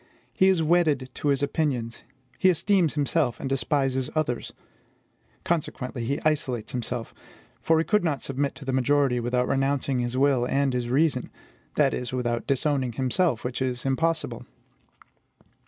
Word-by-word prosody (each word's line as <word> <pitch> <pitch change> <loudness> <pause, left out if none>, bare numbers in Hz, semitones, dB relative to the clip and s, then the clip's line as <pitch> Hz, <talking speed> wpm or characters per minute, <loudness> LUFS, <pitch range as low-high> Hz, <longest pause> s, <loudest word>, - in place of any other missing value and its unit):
He 190 - +4
is 185 -4 +3
wedded 155 -6 +2
to - - -4
his 140 -1 +2
opinions; 135 -6 -1 0.4
he 185 - +5
esteems 180 -2 +2
himself, 145 -3 0
and - - -4
despises 135 -1 0
others. 145 -6 -1 0.9
Consequently, 135 -7 -2
he 140 +5 -1
isolates 130 -7 0
himself; 120 -1 -4 0.5
for 160 - +3
he 160 - +1
could 210 -3 +2
not 150 -5 -1
submit 140 +1 -2
to 140 - -10
the 135 - -2
majority 130 -1 +2
without 125 +1 0
renouncing 135 -1 0
his 120 +1 -2
will 135 -2 +3
and 140 0 +1
his 120 -1 -2
reason, 140 -1 +1 0.5
that - - +3
is, 125 0 -4
without 120 -2 -2
disowning 135 -2 0
himself, 130 +2 +1
which 125 +1 -4
is 125 -1 -2
impossible. 160 +4 -1
135 Hz, 150 wpm, -26 LUFS, 125-155 Hz, 0.9 s, he